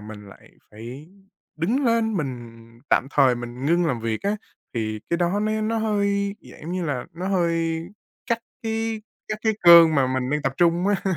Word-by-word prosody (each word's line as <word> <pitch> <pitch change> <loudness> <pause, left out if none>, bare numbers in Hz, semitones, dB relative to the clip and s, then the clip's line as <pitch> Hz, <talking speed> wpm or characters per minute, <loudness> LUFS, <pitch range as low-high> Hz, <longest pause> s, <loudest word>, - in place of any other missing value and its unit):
mình 105 -1 -10
lại - - -16 0.2
phải 120 +8 -10 0.5
đứng 230 - 0
lên, 230 -2 +2
mình 120 -7 -5 0.3
tạm 130 - +3
thời 130 -4 +4
mình 120 +2 -6
ngưng 170 +2 +3
làm 125 -6 -1
việc 110 -1 -3
á, 205 +1 0 0.4
thì 110 -2 -2
cái 170 - +2
đó 175 +4 0
nó 215 +1 0
nó 225 +1 0
hơi, 200 -2 0 0.2
dạng - - -14
giống 165 +3 -5
như 185 -1 -2
là, 135 -5 -2
nó 180 +3 -4
hơi 165 -3 0 0.4
cắt 235 - +1 0.2
cái 225 -1 -2 0.3
cắt 215 - -3
cái 220 - +2
cơn 170 -2 +8
mà 135 -3 +3
mình 130 0 -1
đang 150 0 0
tập 135 - 0
trung 175 +1 +2
á. 205 -1 +1
170 Hz, 195 wpm, -23 LUFS, 130-205 Hz, 0.5 s, cơn